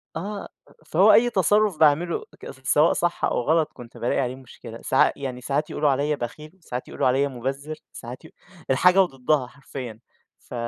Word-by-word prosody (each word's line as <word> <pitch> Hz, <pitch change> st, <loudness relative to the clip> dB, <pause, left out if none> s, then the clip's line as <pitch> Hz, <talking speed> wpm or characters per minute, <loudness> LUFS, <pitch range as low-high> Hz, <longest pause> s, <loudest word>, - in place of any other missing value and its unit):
آه. 200 Hz, +4 st, -5 dB, 0.4 s
فهو 190 Hz, +8 st, +5 dB
أي 240 Hz, +1 st, +5 dB
تصرُّف 205 Hz, -3 st, +2 dB
باعمله 160 Hz, +3 st, +3 dB, 0.2 s
ت 130 Hz, 0 st, -11 dB
سواء 155 Hz, +3 st, +4 dB
صح 175 Hz, 0 st, 0 dB
أو -, -, 0 dB
غلط، 160 Hz, +4 st, +1 dB
كنت 120 Hz, 0 st, -12 dB
بالاقي 120 Hz, +1 st, 0 dB
عليه 125 Hz, 0 st, -2 dB
مشكلة. 120 Hz, -3 st, -12 dB
ساع 130 Hz, -, +3 dB
يعني 130 Hz, -2 st, -5 dB
ساعات 145 Hz, +4 st, -1 dB
يقولوا 150 Hz, -1 st, +1 dB
عليّا 145 Hz, +2 st, +1 dB
بخيل، 150 Hz, +8 st, -8 dB
ساعات 125 Hz, -4 st, -6 dB
يقولوا -, -, -1 dB
عليّا 135 Hz, +3 st, +2 dB
مُبزِر، 135 Hz, +4 st, -5 dB, 0.2 s
ساعات 125 Hz, +6 st, -9 dB
ي -, -, -12 dB, 0.4 s
الحاجة 180 Hz, +8 st, +5 dB
وضدّها 135 Hz, -4 st, 0 dB
حرفيًا. 125 Hz, -4 st, -9 dB, 0.4 s
ف -, -, -14 dB
145 Hz, 170 wpm, -24 LUFS, 125-165 Hz, 0.4 s, فهو